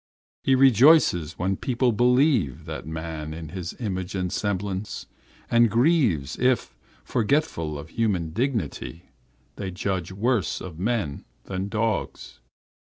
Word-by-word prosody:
He 135 - +4
rejoices 130 - +5
when 95 +2 -1
people 125 -1 +1
believe 125 - +2
that - - -6
man 80 -1 -5
is 80 -2 -8
His 90 -1 -5
image 95 -5 -3
and 90 -2 -2
semblance, 100 0 -3 0.4
and 120 -1 +4
grieves 115 - +2
if, 125 - +1 0.3
forgetful 115 - 0
of 75 +2 -9
human 95 -7 -1
dignity, 100 - -3 0.5
they 100 -2 -4
judge 95 -1 -3
worse 110 +2 0
of 85 -3 -8
men 100 -8 -1 0.2
than 95 0 -4
of - - -6
dogs. 110 -1 -2
100 Hz, 125 wpm, -25 LUFS, 85-120 Hz, 0.5 s, rejoices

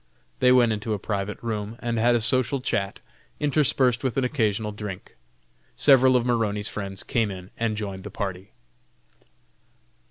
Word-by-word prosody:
They 125 0 +5
went 120 -2 +5
into 110 +1 -3
a - - -3
private 100 0 -4
room 110 -1 -4
and 120 -2 -2
had 120 +2 +3
a 120 - +1
social 130 +3 +4
chat, 105 -6 -2 0.4
interspersed 135 -4 +2
with 130 -1 -2
an 135 - +2
occasional 110 -5 -1
drink. 105 -3 -8 0.6
Several 130 - +5
of 120 -1 +2
Maroney's 110 -4 0
friends 95 -2 -6
came 115 -3 0
in 95 -1 -9
and 115 -2 -2
joined 100 -3 -5
the 105 - -7
party. 95 -1 -5
110 Hz, 155 wpm, -24 LUFS, 105-125 Hz, 0.6 s, They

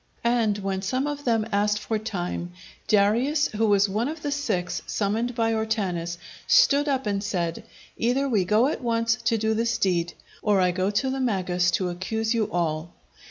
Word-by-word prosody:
And 230 -3 +2
when 195 -1 -3
some 255 +8 -1
among 290 -1 -4
them 225 -3 +2
asked 210 +1 +2
for 215 +1 -2
time, 180 -5 -4 0.3
Darius, 230 +9 +3
who 220 +1 0
was 205 -1 +4
one 215 +5 -1
of 310 +1 -6
the 290 - -2
six 215 -12 -2
summoned 225 +4 -1
by 225 -1 +1
Ortanes, 195 -6 -2 0.3
stood 295 - +5
up 270 -3 0
and 200 -1 -1
said, 175 -5 -2 0.3
"Either 255 +4 +1
we 215 -8 +2
go 210 +6 +3
at 285 - -1
once 230 -2 +1
to 230 -1 +2
do 220 0 0
this 230 0 0
deed, 175 -5 0 0.3
or 205 -2 +2
I 180 -1 +3
go 185 +2 0
to 260 +6 0
the 265 - -3
Magus 185 -7 +1
to 185 -2 -2
accuse 220 +6 -2
you 225 -2 0
all." 165 -1 -2
215 Hz, 185 wpm, -25 LUFS, 190-235 Hz, 0.3 s, stood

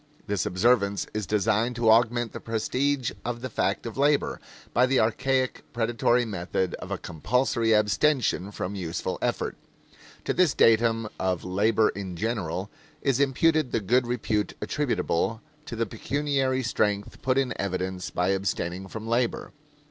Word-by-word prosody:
This 100 -1 -1
observance 100 +1 +2
is 105 -3 -3
designed 110 +3 +1
to 115 -1 +4
augment 120 0 +3
the - - -5
prestige 130 +4 -1
of 120 0 -4
the 130 -1 -5
fact 100 +2 -1
of 115 +3 -6
labor, 145 +1 +2 0.3
by 125 +1 +4
the 130 0 +3
archaic, 130 +4 +1
predatory 120 +1 +2
method 95 -3 -2
of - - -8
a - - -2
compulsory 115 - 0
abstention 105 -1 +2
from 100 -1 -4
useful 90 -4 -3
effort. - - -1 0.7
To - - 0
this 180 -6 +3
datum 115 0 +4
of 95 -2 -1
labor 105 +4 +2
in 95 -3 -5
general 100 -2 -2 0.3
is 135 -2 +2
imputed 145 +1 +2
the - - +1
good 120 +5 +2
repute 110 -4 -1
attributable 110 +7 -1 0.3
to 115 - -5
the 115 0 0
pecuniary 135 +3 -1
strength 105 -3 -1
put 130 0 +1
in 135 -2 +1
evidence 95 -1 -3
by 90 +1 0
abstaining 95 -1 -2
from 110 +3 -7
labor. 120 +1 0
115 Hz, 150 wpm, -26 LUFS, 100-125 Hz, 0.7 s, to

